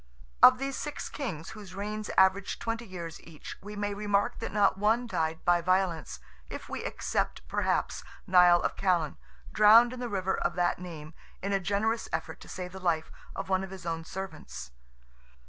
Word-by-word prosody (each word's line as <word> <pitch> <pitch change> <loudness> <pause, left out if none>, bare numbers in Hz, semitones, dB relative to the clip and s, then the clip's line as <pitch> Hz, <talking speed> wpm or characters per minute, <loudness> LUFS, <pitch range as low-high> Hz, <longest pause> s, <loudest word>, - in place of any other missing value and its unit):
Of 255 0 +9
these 275 +1 -3
six 295 -1 -5
kings, 180 - -5
whose 200 -4 -10
reigns 210 +1 -4
average 190 +1 +4
twenty 230 0 -4
years 170 -3 -7
each, 160 -3 -10
we 210 +1 -8
may 205 0 -2
remark 205 0 0
that - - -4
not 205 -2 +3
one 225 +4 +2
died 160 -8 -2
by 175 0 +4
violence, 180 -5 0 0.3
if - - -7
we - - -5
except - - -2
perhaps - - 0 0.2
Nial 180 -1 +6
of - - -1
Callan, 175 -6 +1 0.3
drowned 225 +3 +7
in 255 - -7
the 245 -1 -3
river 190 -2 0
of - - -1
that 175 -1 +1
name 165 -3 -8 0.3
in 200 +1 -1
a 195 - +3
generous 205 +4 0
effort - - -3
to - - -13
save 180 -1 -6
the 190 - -8
life 170 -4 0 0.2
of - - -4
one 190 0 +1
of 195 - -6
his 185 -2 -10
own 165 -1 -2
servants. 155 - -7
190 Hz, 180 wpm, -29 LUFS, 175-210 Hz, 0.3 s, Of